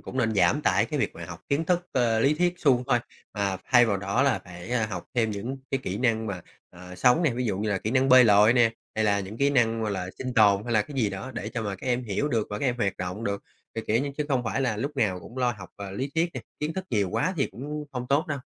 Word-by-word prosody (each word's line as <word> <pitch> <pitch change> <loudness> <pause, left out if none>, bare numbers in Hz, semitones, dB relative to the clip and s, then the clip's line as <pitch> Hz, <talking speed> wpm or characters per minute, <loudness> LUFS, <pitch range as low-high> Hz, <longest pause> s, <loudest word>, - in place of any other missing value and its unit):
cũng 130 - -7
nên 110 -3 +1
giảm - - +3
tải - - +3
cái - - -3
việc - - -1
mà - - -8
học - - -9
kiến 145 +4 +1
thức, 175 +1 0
à, 115 -3 +2
lý 140 +6 +3
thuyết 175 +2 +1
suông 125 -6 +3
thôi. 120 - +3 0.4
Mà 100 -2 -1
thay 120 -2 +5
vào 100 -3 +1
đó 100 +6 0
là 135 -3 +2
phải, 90 +1 -10
ơ, 115 -3 +1
học 105 -3 -6
thêm 115 -3 +2
những 115 +7 -4
cái 135 - 0
kỹ 95 -3 -3
năng 115 -3 +1
mà, 100 -3 -4 0.3
à, 90 0 -11
sống 125 - +4
nè, 155 - +3
ví 125 +1 -2
dụ 100 -4 -1
như 110 - -1
là 100 - +1
kỹ 110 - -3
năng 130 +2 +2
bơi 130 -1 +8
lội 105 +1 +6
nè, 120 -2 +4 0.2
hay 110 - +1
là 100 -1 +2
những 100 +3 -7
kỹ 140 +3 +2
năng, 115 -4 +2
gọi 110 - -1
là, 90 -2 -3
sinh 125 -1 -4
tồn 105 -3 +5
hay 120 - -3
là 110 -2 +4
cái 145 +7 -11
gì 110 -6 +1
đó 95 +7 -6
để 105 - -4
cho 115 -1 -4
mà 100 -2 -3
các - - -10
em 125 0 0
hiểu 115 +7 -1
được 115 -6 0
và 105 - -3
các - - -3
em 125 -1 0
hoạt 100 -5 -1
động 90 +5 -5
được. 100 0 -2 0.3
Ờ, 115 - -3
kiểu 115 +5 +2
như 140 - -3
chứ 150 - -1
không 130 -4 +1
phải 120 +4 -1
là 120 -5 0
lúc 140 +6 -4
nào 95 -8 +1
cũng 125 +8 -10
lo 125 -1 +2
học, 90 - -9
à, 100 -1 -7
lý 130 +8 -4
thuyết 170 +1 +1
nè, - - -4 0.2
kiến 150 +2 -1
thức 190 -1 -4
nhiều 100 -4 +1
quá 150 - 0
thì 135 - +1
cũng 150 +8 -6
hông 125 -1 -4
tốt 145 +6 +2
đâu. 145 -3 -3
115 Hz, 300 wpm, -26 LUFS, 100-135 Hz, 0.4 s, bơi